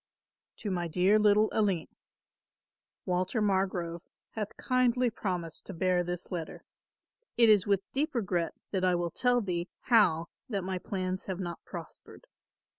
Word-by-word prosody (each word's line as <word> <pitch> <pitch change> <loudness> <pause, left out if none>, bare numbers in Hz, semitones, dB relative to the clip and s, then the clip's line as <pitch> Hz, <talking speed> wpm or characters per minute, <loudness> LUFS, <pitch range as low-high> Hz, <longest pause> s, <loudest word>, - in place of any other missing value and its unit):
"To 205 - -4
my 175 -2 -1
dear 185 +6 +3
little 210 0 +5
Aline, 195 -6 +1 1.2
"Walter 185 +4 0
Margrove 190 -4 0 0.3
hath 210 -1 -5
kindly 250 -1 +2
promised 180 -6 -4
to 195 - -7
bear 180 +1 +2
this 175 +1 -5
letter. 165 -3 -5 0.7
It 230 -2 +6
is 205 -2 +5
with 200 -2 +3
deep 285 +1 -1
regret 180 -7 -1 0.2
that 190 -2 -1
I 180 -1 +4
will 175 -1 -1
tell 245 +4 +2
thee 175 -3 -2
how 200 -9 +4 0.2
that 200 -5 -2
my 185 0 -2
plans 185 0 -3
have 190 -1 -4
not 175 -2 -5
prospered. - - -10
190 Hz, 145 wpm, -30 LUFS, 175-215 Hz, 1.2 s, It